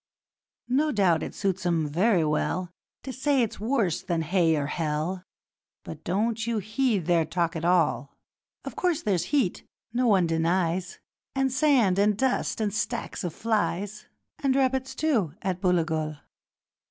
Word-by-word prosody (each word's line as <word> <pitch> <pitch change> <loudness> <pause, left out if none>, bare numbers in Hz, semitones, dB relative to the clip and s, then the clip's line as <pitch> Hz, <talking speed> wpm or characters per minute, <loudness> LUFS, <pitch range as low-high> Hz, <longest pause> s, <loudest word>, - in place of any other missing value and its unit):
'No 290 +5 +2
doubt 180 - +2
it - - -6
suits 190 -2 -1
'em 170 -3 +1
very 180 +4 +2
well 170 +4 -1 0.3
To 265 - -6
say 270 0 +2
it's 225 - -4
worse 220 - 0
than 170 -2 -1
Hay 165 -1 +2
or 145 -2 -1
Hell, 160 +4 -2 0.6
But 160 -1 -9
don't 225 +5 -1
you 230 -1 0
heed 215 - 0
their 170 -1 +3
talk 170 +2 -1
at 165 - -4
all; 165 -5 +1 0.5
Of - - -6
course, 345 -3 0
there's 190 -5 +1
heat 275 -11 0 0.3
no 250 +1 +2
one 195 -5 +4
denies 170 +2 0 0.4
And 270 -1 +1
sand 255 -9 +3
and 205 0 +3
dust 260 -1 0
and 210 -3 -1
stacks 235 +1 -3
of 175 -3 -4
flies, 210 -2 -1 0.3
And 270 -2 +1
rabbits, 265 -1 0
too, 225 - 0
at 185 -1 -2
Booligal. 160 -4 0
190 Hz, 155 wpm, -26 LUFS, 170-235 Hz, 0.6 s, one